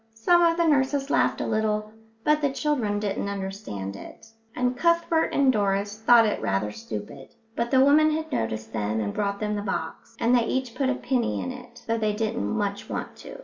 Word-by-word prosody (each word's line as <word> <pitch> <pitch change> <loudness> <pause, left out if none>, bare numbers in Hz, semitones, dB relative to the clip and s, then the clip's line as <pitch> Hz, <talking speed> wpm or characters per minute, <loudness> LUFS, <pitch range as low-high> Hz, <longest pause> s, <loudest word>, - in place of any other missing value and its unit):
Some 345 +11 +4
of 335 -1 +3
the 340 - +2
nurses 280 -1 +1
laughed - - +2
a - - -1
little, 215 0 -1 0.3
but 300 0 +3
the 285 - +2
children 260 -8 -1
didn't 200 -1 -2
understand 190 - -5
it, 225 - -12 0.2
and 250 0 0
Cuthbert 335 +2 +2
and 270 -2 +3
Doris 205 -1 0
thought 230 0 +6
it 210 - -1
rather 100 +2 -1
stupid, 105 +4 -8 0.2
but 235 0 -1
the 265 0 +5
woman 305 +2 +5
had 315 0 -3
noticed 110 - -3
them 110 0 -1
and 100 -2 -2
brought 200 -1 -2
them 210 0 -1
the 205 - -2
box, 205 - -5
and 235 +2 +2
they 240 -2 +3
each 260 -3 -2
put 270 +1 0
a 265 - +1
penny 250 -2 -1
in 260 - -3
it, 245 -1 -12
though 230 0 -1
they 215 -1 0
didn't 225 +2 -2
much 205 -2 -2
want - - -5
to. - - -10
225 Hz, 205 wpm, -25 LUFS, 200-270 Hz, 0.3 s, thought